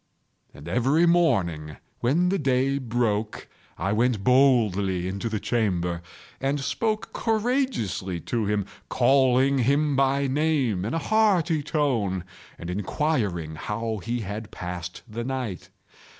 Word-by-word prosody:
And 70 - -12
every 135 +8 +3
morning, 85 - +1 0.2
when 165 +9 +2
the 195 - 0
day 135 0 +1
broke, 115 -4 -1 0.3
I 95 - -1
went 115 -2 +1
boldly 105 -8 +3
into 100 +4 -3
the 110 -1 -2
chamber, 90 -7 -1 0.4
and 135 +2 0
spoke 215 - -2
courageously 220 - -1
to 115 +2 -2
him, 105 -1 0 0.2
calling 130 +1 +3
him 140 +4 +2
by 135 +1 +2
name 135 - +1
in 115 - -2
a 165 - -3
hearty 185 -8 +3
tone, 120 - 0 0.3
and 85 +1 -6
inquiring 100 - -1
how 110 +7 -3
he 120 +4 -2
has 105 +2 -5
passed 90 -1 -6
the 115 +1 -5
night. 125 -7 -4
120 Hz, 125 wpm, -25 LUFS, 100-140 Hz, 0.4 s, every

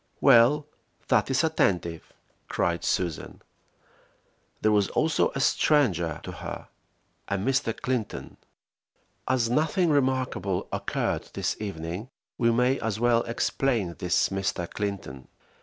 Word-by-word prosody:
"Well, 135 +3 +5 0.4
that 125 -3 +3
is 135 +3 +2
attentive!" 90 - 0 0.4
cried 85 0 -1
Susan. 85 -4 -2 1.2
There 110 - +3
was 105 -2 +3
also 160 0 +1
a - - -1
stranger 95 - +2
to - - -6
her, - - -7 0.6
a 100 - -1
Mr. 115 +2 0
Clinton. 125 -5 -3 0.9
As 125 -2 +2
nothing 160 +5 +2
remarkable 130 -9 0
occurred - - -2
this - - -1
evening, 95 +2 -5 0.3
we 115 -2 +3
may 125 +3 +2
as 110 -1 -2
well 120 0 +3
explain 115 -4 0
this 90 -1 +2
Mr. 95 -2 -2
Clinton. 95 -12 -5
115 Hz, 115 wpm, -27 LUFS, 95-130 Hz, 1.2 s, Well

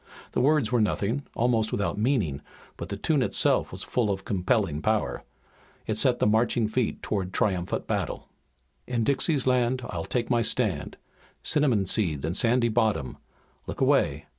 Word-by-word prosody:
The - - 0
words 150 +1 +2
were 120 -2 +3
nothing, 110 +6 -1
almost 115 -2 +1
without 100 - -1
meaning, 105 - 0 0.3
but - - -7
the 100 - -4
tune 145 +7 +1
itself 125 - +1
was - - -6
full 120 -4 0
of 95 -1 -3
compelling 95 -5 0
power. 110 +2 -1 0.6
It 110 - -1
set 120 +3 +2
the - - +1
feet 105 - +3
marching 110 0 +2 0.3
toward 95 -3 -2
triumphant 95 -5 -1
battle. - - -3 0.6
"In 120 -2 -1
Dixie's 140 +2 +2
land 125 0 +1
I'll 80 - -4
take 120 -2 -2
my 120 -1 +3
stand, 115 - 0 0.5
Cinnamon 130 -10 +2
seed 85 -8 0
and 80 +3 -2
sandy 120 +2 +3
bottom, 110 - 0 0.5
Look - - -6
away! 75 +1 +2
110 Hz, 160 wpm, -26 LUFS, 100-125 Hz, 0.6 s, were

